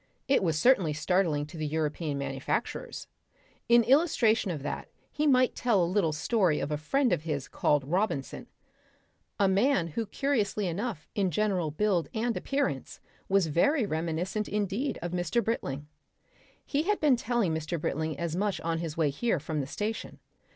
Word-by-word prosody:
It 275 - +3
was 165 -5 +1
certainly 185 - +4
startling 155 -1 +1
to 150 +3 -11
the 155 -1 -2
European 155 -1 -2
manufacturers. 135 -1 -3 0.6
In 235 0 +7
illustration 245 - +3
of 155 -6 -4
that - - -4 0.2
he 300 +1 0
might 255 -2 +4
tell 220 -7 +2
a - - +3
little 180 -2 +1
story 165 +1 +1
of 150 - -3
a - - +1
friend 250 - +1
of - - 0
his 150 -4 -3
called 145 -2 +1
Robinson 165 -2 -2 0.9
a 200 - +4
man 195 -2 +2
who 220 +8 -3
curiously 210 -6 0
enough 195 0 -3
in 195 -3 +1
general 185 -2 0
build 180 +2 0
and 230 +1 0
appearance 255 - -2 0.3
was 195 -2 +4
very 220 - +2
reminiscent 170 +5 -2
indeed 210 +6 -1
of 175 - -3
Mr. 180 +7 0
Britling. 145 -11 -2 0.8
He 285 - 0
had 415 +5 0
been 295 -4 +4
telling 235 -7 0
Mr. 160 +2 -3
Britling 155 0 -2
as 170 +1 -2
much 200 +1 0
on 165 0 -1
his 165 -2 -5
way 155 -4 +2
here 205 +4 0
from 155 +1 -3
the 135 - -5
station. 210 +9 -4
185 Hz, 165 wpm, -29 LUFS, 155-230 Hz, 0.9 s, In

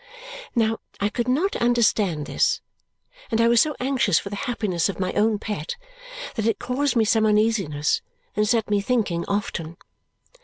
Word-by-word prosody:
Now, 225 -1 +1 0.2
I 205 - +1
could 240 +2 -2
not 310 +11 +1
understand 210 -9 +2
this, - - +1 0.7
and 225 - 0
I 230 - +5
was 235 0 +5
so 300 -2 0
anxious 255 - +2
for 200 - -3
the - - -3
happiness 195 -7 0
of 195 - -5
my 185 -1 -1
own 215 +1 +2
pet 220 - -4 0.6
that 225 -5 -1
it 225 - +1
caused 270 +2 -1
me 225 -2 +4
some 220 0 +3
uneasiness 210 -9 +1 0.3
and 210 0 +1
set 225 -2 +2
me 205 -1 +3
thinking 200 -7 0
often. 170 -5 -3
220 Hz, 165 wpm, -24 LUFS, 200-240 Hz, 0.7 s, I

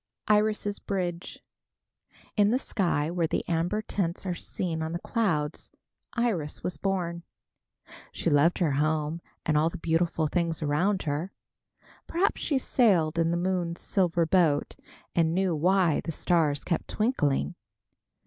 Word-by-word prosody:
IRIS' 210 -1 +2
BRIDGE. 180 -3 -4 0.9
In 205 -1 +4
the 240 - +3
sky 170 - 0
where 170 -2 0
the - - -2
amber 175 +6 0
tints 180 -3 -2
are 180 - -1
seen 165 -1 -3
on 160 +1 -3
the - - -1
clouds, 160 -9 -1 0.4
Iris 215 - -1
was 180 - -2
born. 175 -3 -2 0.9
She - - -4
loved 145 +4 +4
her 170 -5 +1
home 155 +3 0 0.2
and 155 - +1
all 160 +2 +3
the 180 - -7
beautiful 165 -1 +1
things 165 0 -1
around 180 +7 +1
her. 155 +5 -2 0.8
Perhaps 365 +4 0
she 285 - +1
sailed 180 - +2
in 165 0 +2
the 170 - +1
moon's 175 -1 -1
silver 175 -3 +1
boat 160 -4 +2 0.4
and 165 -1 +2
knew 185 -3 +1
why 175 0 +3
the 165 - -3
stars 155 -3 +1
kept 170 - -2
twinkling. 150 - 0
170 Hz, 140 wpm, -28 LUFS, 160-195 Hz, 0.9 s, In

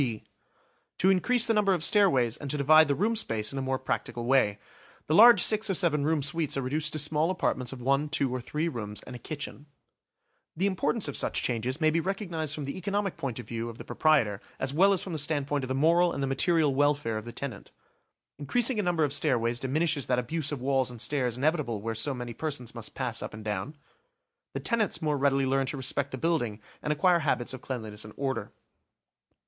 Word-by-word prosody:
B: 115 -5 -2 0.7
To 190 +2 +4
increase 235 +6 +3
the 225 - +2
number 200 -3 +3
of 165 - -3
stairways, 135 - +3
and 145 - -7
to 150 - -1
divide 155 +2 +6
the 140 - +1
room 220 +7 +1
space 110 - -1
in 135 - -3
a - - -2
more 130 0 -1
practical 120 -2 -3
way. 120 -6 +3 0.5
The 155 - -1
large 225 +1 +8
six 215 0 +1
or 195 - +1
seven 150 -4 +2
room 155 -1 +1
suites 150 +1 0
are 135 - -1
reduced 150 +4 -1
to - - -3
small 150 +2 +1
apartments 130 -9 -1
of 135 -2 -8
one, 140 +3 +1
two, 140 -4 0
or 130 - -3
three 150 +7 -2
rooms, 105 -8 -5
and 125 - -9
a - - -8
kitchen. 145 +1 -7 0.9
The 185 - +1
importance 200 +2 0
of 145 - -4
such - - +1
changes 125 +4 -2
may 155 -1 +3
be 165 - +1
recognised 170 -5 -3
from 150 - -5
the 140 - -5
economic 200 +1 -2
point 130 -5 -4
of 120 - -8
view 115 0 -4
of 115 - -10
the - - -8
proprietor 120 -11 +2 0.2
as 130 +1 -1
well 190 +6 +5
as 195 - +1
from 185 - -6
the 155 - -2
standpoint 145 -1 0
of - - -8
the 130 - -2
moral 170 +5 +3
and 140 - -3
the - - +2
material 150 +2 +2
welfare 145 -5 +1
of 110 - -11
the 120 - -7
tenant. 125 -4 -7 0.7
Increasing 235 - +1
a - - +3
number 175 -4 +1
of 145 -2 0
stairways 120 -5 +1
diminishes 140 +2 0
that 125 - +1
abuse 150 +5 -2
of 145 - -3
walls 135 -1 +1
and 120 -2 -9
stairs 125 -1 -1
inevitable 140 -6 0
where 115 +2 -3
so 130 +5 0
many 120 -1 -6
persons 130 -3 -4
must 115 -2 -7
pass 125 -3 -3
up - - -6
and 110 0 -10
down. 105 +8 -3 0.8
The - - -3
tenants 225 -7 0
more 155 -3 0
readily 135 0 +2
learn 135 0 +1
to 145 - -3
respect 140 +1 0
the 130 - -6
building 125 -9 -1 0.2
and 150 - -2
acquire 175 +3 +3
habits 130 -5 -1
of 130 - -8
cleanliness 110 -5 -5
and 105 0 -12
order. 135 -1 -3
140 Hz, 225 wpm, -28 LUFS, 125-165 Hz, 0.9 s, large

